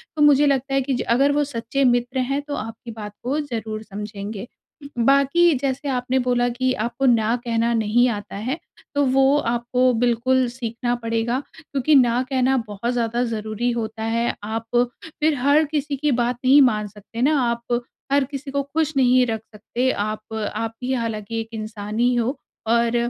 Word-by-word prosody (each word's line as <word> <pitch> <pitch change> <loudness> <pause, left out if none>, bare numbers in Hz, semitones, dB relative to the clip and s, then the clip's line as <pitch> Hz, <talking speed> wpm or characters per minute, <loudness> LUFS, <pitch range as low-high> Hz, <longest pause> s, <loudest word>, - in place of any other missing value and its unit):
तो 300 - -1
मुझे 295 0 +6
लगता 270 0 0
है 270 - +3
कि 265 +1 -1
ज - - -2
अगर 275 +4 +4
वो 295 +1 +2
सच्चे 270 0 -2
मित्र 245 +1 +1
हैं 275 +3 0
तो 285 - -3
आपकी 225 +2 -7
बात 210 -2 -8
को 275 +5 0
ज़रूर 220 -6 -4
समझेंगे। 210 +1 -6 0.4
उ, - - -7 0.2
बाकी 280 +5 +4
जैसे 275 +1 -2
आपने 255 0 0
बोला 245 -1 +1
कि 255 +2 0
आपको 235 +4 -2
ना 230 -1 +3
कहना 230 0 +1
नहीं 225 +2 +3
आता 205 -3 -5
है। 250 +9 -3 0.4
तो 285 - +3
वो 270 +2 +4
आपको 245 +1 +1
बिल्कुल 245 +2 +2
सीखना 240 0 -3
पड़ेगा, 230 +1 -1 0.2
क्योंकि 290 -1 +1
ना 245 -1 +4
कहना 265 0 +2
बहुत 210 +4 -3
ज़्यादा 235 0 0
ज़रूरी 220 +1 -2
होता 220 -1 -4
है। 230 +1 0
आप 225 +2 -3 0.6
फिर 310 -1 +3
हर 285 +4 +4
किसी 295 -1 -1
की 295 +1 +1
बात 240 0 0
नहीं 280 +2 +7
मान 215 -5 +3
सकते 210 +3 -9
ना, 290 +2 +3
आप 235 0 -1 0.3
हर 280 -1 +4
किसी 275 0 -6
को 280 0 0
खुश 310 +2 -1
नहीं 255 -1 +5
रख 220 -1 -2
सकते। 235 +5 -1
आप 215 +1 -4 0.2
आप 225 0 -2
भी 260 +1 -1
हालाँकि 225 -2 -3
एक 225 - -9
इंसान 215 0 -5
ही 245 +1 +3
हो 240 +4 0 0.3
और 235 +1 +2
245 Hz, 180 wpm, -22 LUFS, 225-270 Hz, 0.6 s, नहीं